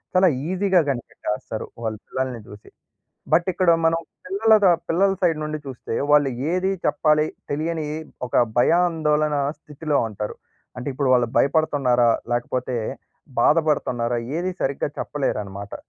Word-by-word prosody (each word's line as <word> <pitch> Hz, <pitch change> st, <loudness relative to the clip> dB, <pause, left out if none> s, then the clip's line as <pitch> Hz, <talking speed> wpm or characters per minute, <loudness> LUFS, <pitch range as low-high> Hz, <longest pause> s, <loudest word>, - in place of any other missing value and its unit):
చాలా 185 Hz, -1 st, +6 dB, 0.2 s
ఈజీగా 190 Hz, -1 st, +3 dB
కనిపెట్టేస్తారు, 110 Hz, -3 st, -4 dB, 0.2 s
వాళ్ళు 110 Hz, -1 st, -3 dB
పిల్లల్ని 130 Hz, -3 st, -3 dB
చూసి. 105 Hz, -3 st, -13 dB, 0.6 s
బట్ 170 Hz, +3 st, +4 dB
ఇక్కడ 185 Hz, 0 st, 0 dB, 0.2 s
మనం 165 Hz, 0 st, +2 dB, 0.3 s
పిల్లలదా 205 Hz, 0 st, +4 dB, 0.2 s
పిల్లల 195 Hz, +4 st, +3 dB
సైడ్ 165 Hz, -3 st, +2 dB
నుండి 155 Hz, 0 st, -4 dB
చూస్తే, 130 Hz, -3 st, -6 dB, 0.2 s
వాళ్ళు 145 Hz, -2 st, +5 dB, 0.2 s
ఏది 185 Hz, +1 st, +1 dB, 0.2 s
చెప్పాలి 150 Hz, 0 st, +3 dB, 0.3 s
తెలియని 160 Hz, +1 st, -2 dB, 0.4 s
ఒక -, -, -11 dB, 0.2 s
భయాందోళన 155 Hz, -1 st, +2 dB, 0.2 s
స్థితిలో 150 Hz, -1 st, -2 dB
ఉంటారు. 105 Hz, 0 st, -5 dB, 0.4 s
అంటే 125 Hz, -, -4 dB
ఇప్పుడు 130 Hz, 0 st, +1 dB
వాళ్ళు 120 Hz, -2 st, +2 dB
భయపడుతున్నారా 135 Hz, -5 st, +3 dB, 0.2 s
లేకపోతే, 125 Hz, +1 st, -1 dB, 0.7 s
బాధపడుతున్నారా 125 Hz, -7 st, +2 dB, 0.2 s
ఏది 185 Hz, +1 st, -1 dB
సరిగ్గా 140 Hz, +1 st, -1 dB
చెప్పలేరన్నమాట. 100 Hz, -8 st, -3 dB
150 Hz, 115 wpm, -23 LUFS, 125-170 Hz, 0.7 s, చాలా